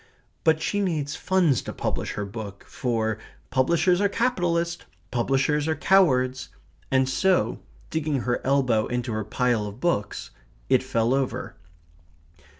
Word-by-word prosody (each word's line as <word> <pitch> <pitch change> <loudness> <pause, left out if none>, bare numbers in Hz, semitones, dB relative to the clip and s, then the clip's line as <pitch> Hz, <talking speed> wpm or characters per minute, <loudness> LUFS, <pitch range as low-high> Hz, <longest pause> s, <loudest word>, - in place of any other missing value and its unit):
But 160 -1 +3
she 205 - 0
needs 155 -7 -1
funds 180 -9 +2
to - - -6
publish - - -2
her 105 - -3
book, 100 -1 -8
for 110 -3 -1 0.3
"publishers 170 +7 +3
are 200 - +3
capitalists 175 -8 0 0.3
publishers 135 +5 +1
are 160 - +1
cowards." 130 -7 +3 0.4
And 130 0 +3
so, 185 +8 +2 0.3
digging 155 -4 0
her 120 0 -1
elbow 130 -5 +2
into 125 -1 -2
her 110 0 -1
pile 115 0 0
of 105 +3 -9
books 130 -11 -1 0.4
it 130 -1 +4
fell 115 -2 +1
over. 130 -2 -2
130 Hz, 135 wpm, -25 LUFS, 120-170 Hz, 0.4 s, it